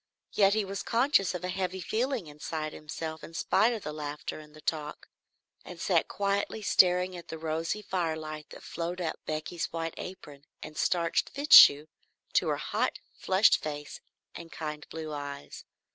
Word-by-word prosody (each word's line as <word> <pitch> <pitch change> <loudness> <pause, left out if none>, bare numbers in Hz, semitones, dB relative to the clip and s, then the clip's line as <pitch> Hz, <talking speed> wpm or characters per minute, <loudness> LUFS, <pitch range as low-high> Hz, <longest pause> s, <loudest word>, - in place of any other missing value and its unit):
Yet 200 0 +4
he 215 -2 +1
was 195 +1 -4
conscious 235 -7 +2
of 180 - -5
a 180 - -2
heavy 185 0 -2
feeling 235 +4 -1
inside 155 +1 -5
himself 160 +1 -6
in 165 - -10
spite 225 +7 +3
of 225 -4 -4
the 150 - -5
laughter 150 0 -5
and 150 0 -14
the - - -13
talk, 150 -2 -3 0.6
and - - -10
sat - - +2
quietly 200 +2 -1
staring 180 -1 +4
at 175 - -9
the 160 - -6
rosy 165 +6 -2
firelight 160 -5 -3
that - - -12
flowed 175 +2 -4
up 170 -3 -3
Becky's 155 +2 -3
white 165 0 -3
apron 145 -6 -9 0.2
and 155 - -9
starched 170 +1 +1
fichu 210 - +8 0.5
to - - +3
her - - +1
hot, - - -1 0.2
flushed 190 +3 +3
face 145 -1 -6 0.3
and 165 -1 -10
kind 150 -2 -6
blue 160 -1 -6
eyes. 145 -1 -7
165 Hz, 165 wpm, -29 LUFS, 155-190 Hz, 0.6 s, fichu